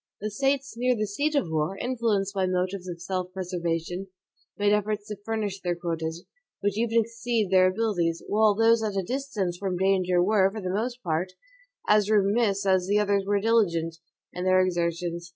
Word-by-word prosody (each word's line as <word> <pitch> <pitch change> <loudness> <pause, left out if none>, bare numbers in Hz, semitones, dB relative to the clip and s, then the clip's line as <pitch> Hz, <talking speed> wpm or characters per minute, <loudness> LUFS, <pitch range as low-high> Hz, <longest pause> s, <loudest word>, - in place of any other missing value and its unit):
The 215 +1 -4
States 275 +4 0
near 250 +1 +1
the 215 -1 -1
seat 285 +10 -1
of 250 - 0
war, 155 +4 -1
influenced 225 -6 -1
by 190 -2 0
motives 185 +1 -2
of 175 -1 -6
self 185 +1 -3
preservation, 180 0 -3 0.5
made 205 0 +3
efforts 210 0 -1
to 210 - -4
furnish 210 -3 -3
their 175 -1 -1
quotas, 165 -1 -4 0.4
which 200 0 0
even 230 +1 +2
exceeded 230 -2 -2
their 185 -1 +6
abilities; 185 -5 0
while 215 0 +3
those 225 +1 +4
at 210 -3 -2
a 195 - 0
distance 215 -6 -3
from 190 -2 -2
danger 185 -1 +2
were, 195 -1 +3
for 220 - -6
the 185 -2 -3
most 240 +4 -3
part, 175 +2 -1 0.5
as 210 -1 +4
remiss 205 -1 +2
as 185 -1 +2
the 205 +1 +2
others 200 -1 +1
were 205 0 +2
diligent, 170 -7 +1 0.4
in 180 - -4
their 185 0 +4
exertions. 170 -1 -2
195 Hz, 180 wpm, -26 LUFS, 180-220 Hz, 0.5 s, their